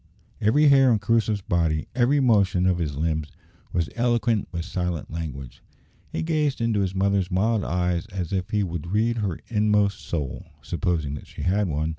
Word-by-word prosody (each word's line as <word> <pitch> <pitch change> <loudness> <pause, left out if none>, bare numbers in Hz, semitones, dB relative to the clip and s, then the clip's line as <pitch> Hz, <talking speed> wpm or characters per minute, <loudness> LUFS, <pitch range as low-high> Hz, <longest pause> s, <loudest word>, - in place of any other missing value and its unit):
Every 145 +8 +4
hair 135 -2 +6
on 110 - +4
Crusoe's 110 0 +1
body, 80 -4 0
every 130 +4 +3
motion 100 -8 +3
of 90 -1 +2
his 75 -4 -2
limbs, 80 -1 -1 0.4
was 85 -1 0
eloquent 120 -3 +1
with 85 -2 -4
silent 90 -4 -3
language. 70 -6 -6 0.5
He - - -2
gazed 155 -4 0
into 115 -3 +1
his 95 -1 -1
mother's 95 -1 +1
mild 105 +3 +1
eyes 90 +1 -1
as 95 -4 -4
if 95 -1 -1
he 105 -1 +1
would 85 -3 -4
read 110 +5 +1
her 100 -7 -2
inmost 105 -3 +2
soul 75 -6 -4 0.2
(supposing 80 -5 -1
that 75 - -8
she - - -8
had 95 +3 +1
one). 80 0 -1
95 Hz, 175 wpm, -24 LUFS, 85-110 Hz, 0.5 s, hair